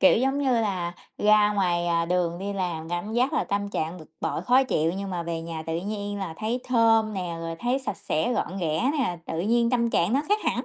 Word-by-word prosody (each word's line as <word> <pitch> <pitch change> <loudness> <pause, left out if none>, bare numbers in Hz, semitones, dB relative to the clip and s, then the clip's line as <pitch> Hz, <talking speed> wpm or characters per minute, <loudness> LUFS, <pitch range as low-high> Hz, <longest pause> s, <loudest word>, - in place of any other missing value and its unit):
Kiểu, 280 - +6
giống 270 +3 +1
như 275 -2 +2
là, 180 -5 -1 0.2
ra 210 0 +5
ngoài, 175 -4 +1
à, 170 -1 +2
đường 175 0 0
đi 200 +2 -3
làm 175 -5 -3
cảm 175 +5 -3
giác 250 +3 +2
là - - +1
tâm 200 0 -1
trạng 170 -2 -3
bực 155 - -14
bội, - - -2
khó 255 +2 +5
chịu 165 -9 +1
nhưng 195 -1 -4
mà 175 -2 -2
về 165 -1 -3
nhà 165 -1 -5
tự 165 0 -1
nhiên 205 +1 -4
là 190 -5 -4
thấy 230 +3 -1
thơm 225 -3 +3
nè, 180 -3 -3
rồi 165 0 -4
thấy 245 +2 0
sạch 235 -9 -4
sẽ, 160 +10 -1
gọn 200 -5 -2
ghẽ 170 - +1
nè, 205 -11 0
tự 165 - -2
nhiên 235 +4 +2
tâm 235 -2 +2
trạng 175 +1 +2
nó 270 - +3
khác 415 - +3
hẳn, - - 0
200 Hz, 240 wpm, -26 LUFS, 170-230 Hz, 0.2 s, Kiểu